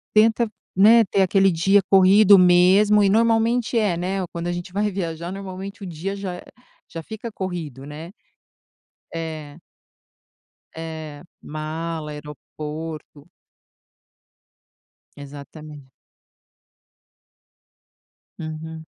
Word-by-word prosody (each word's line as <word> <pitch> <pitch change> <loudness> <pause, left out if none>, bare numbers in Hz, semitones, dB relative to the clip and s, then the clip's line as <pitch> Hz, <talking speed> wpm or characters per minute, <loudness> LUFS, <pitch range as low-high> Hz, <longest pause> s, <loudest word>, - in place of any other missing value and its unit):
tenta, 225 +2 +4 0.3
né, 225 +4 +7
ter 195 - +1
aquele 195 +1 +3
dia 195 +4 +3
corrido 195 +1 +7
mesmo 185 +4 +5
e 200 - +4
normalmente 230 +3 +2
é, 210 -6 +2
né, 190 +3 -2
ou 180 - -5
quando 170 0 -6
a 175 - -1
gente 175 0 -6
vai 205 +2 0
viajar 170 -3 -4
normalmente 195 +1 -8
o - - -6
dia 175 +3 -5
já 190 -3 -6 0.5
já 165 - -7
fica 220 +6 -8
corrido, 170 -9 -6
né, 155 +5 -9 1.0
é. 155 -3 -6 1.2
É, 160 -2 -7 0.2
mala, 155 +1 -5
aeroporto. 150 +1 -8 1.9
Exatamente. 145 0 -11 2.5
Uhum. 160 0 -7
175 Hz, 100 wpm, -22 LUFS, 155-200 Hz, 2.5 s, né